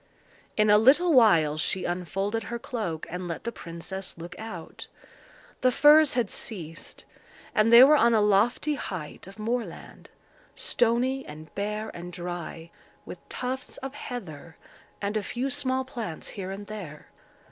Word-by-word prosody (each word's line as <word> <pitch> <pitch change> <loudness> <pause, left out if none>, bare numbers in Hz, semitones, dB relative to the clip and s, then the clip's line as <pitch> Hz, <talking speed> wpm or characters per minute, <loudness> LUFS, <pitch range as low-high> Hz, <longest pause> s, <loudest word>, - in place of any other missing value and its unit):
In 215 -1 +4
a 210 - +7
little 300 +9 +5
while 165 - +5
she 185 +3 0
unfolded 195 +5 -2
her 235 - -4
cloak, 210 -10 -4
and 180 +1 -5
let 170 - -5
the 235 - -3
princess 180 0 -6
look 170 +2 -8
out. 200 -7 -8 0.7
The 255 - +5
firs 295 +2 +6
had 235 -5 0
ceased; 165 -7 -6 0.5
and 215 +2 +3
they 235 +2 +11
were 295 +3 +7
on 235 -5 +4
a - - +5
lofty 210 +8 +2
height 185 - -6
of 195 +1 -12
moorland, 230 +2 -5 0.5
stony 245 +3 +1
and 155 +1 -11
bare 210 +2 -3
and 175 +1 -7
dry, 175 -1 -6 0.3
with - - -8
tufts 255 +1 -4
of 270 - -5
heather 175 - -8 0.5
and 200 +2 -1
a 215 - +1
few 245 +7 -3
small 260 -2 0
plants 230 - -6
here 190 -2 -6
and 195 +1 -6
there. 190 -8 -9
210 Hz, 150 wpm, -27 LUFS, 175-245 Hz, 0.7 s, they